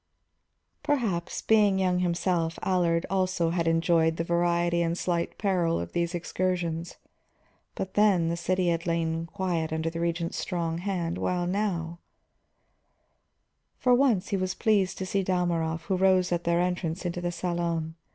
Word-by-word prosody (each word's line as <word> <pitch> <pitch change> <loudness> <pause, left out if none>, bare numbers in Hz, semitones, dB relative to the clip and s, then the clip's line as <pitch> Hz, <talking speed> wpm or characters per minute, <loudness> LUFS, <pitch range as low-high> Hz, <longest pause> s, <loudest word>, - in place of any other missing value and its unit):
Perhaps, 220 -12 -1
being 210 -3 +4
young 185 -1 +1
himself, 170 -1 0
Allard 175 -3 +1
also 185 -3 0
had 170 -1 0
enjoyed 165 0 +2
the 165 - 0
variety 170 0 +1
and 170 0 0
slight 170 -2 -1
peril 180 -5 +1
of 85 0 -5
these 170 +1 -1
excursions. 175 -1 -2 0.8
But 190 - -4
then 200 -5 +3
the 170 - 0
city 180 +1 0
had 170 +1 -1
lain 165 0 -1
quiet 175 -4 -2
under 160 +1 -1
the 165 - -5
Regent's 170 0 -2
strong 170 -2 -2
hand, 175 -3 -2
while 180 -1 0
now 175 -3 -2 1.8
For 250 - +3
once 245 -7 +3
he 200 - 0
was 185 0 -2
pleased 205 -5 +1
to 190 - -3
see 195 +1 0
Dalmorov, 170 -3 0
who 190 +3 -1
rose 185 -1 +3
at 175 0 -1
their 170 0 +2
entrance 180 -1 -2
into 175 0 -2
the 175 0 -1
salon. 170 -2 -2
175 Hz, 150 wpm, -27 LUFS, 165-185 Hz, 1.8 s, being